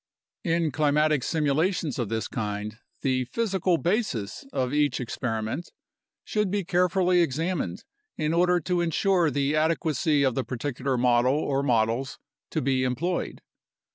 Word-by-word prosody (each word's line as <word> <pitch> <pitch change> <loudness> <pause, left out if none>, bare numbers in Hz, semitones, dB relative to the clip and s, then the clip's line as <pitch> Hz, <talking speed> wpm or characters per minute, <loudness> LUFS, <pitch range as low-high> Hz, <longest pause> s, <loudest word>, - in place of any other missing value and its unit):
In 165 -3 +1
climatic 150 0 +2
simulations 155 +1 0
of 120 -4 -1
this 110 0 -2
kind 105 -1 -4 0.2
the 130 -1 +1
physical 190 - 0
basis 170 - -1
of 130 - -1
each 150 -1 +2
experi 115 -2 -3
ment 130 +11 -4 0.5
should 210 -2 0
be 200 +1 -1
carefully 180 0 +2
examined 160 - -1 0.3
in 155 +1 0
order 180 +1 +3
to 180 +2 0
ensure 175 +1 +2
the 140 +1 0
adequacy 155 -2 +1
of 130 -2 +2
the 135 - -1
particular 130 +1 -2
model 125 +2 +3
or 140 -2 0
models 120 0 0 0.3
to - - -2
be 130 -1 +1
employed. 140 +8 -2
145 Hz, 140 wpm, -26 LUFS, 125-175 Hz, 0.5 s, order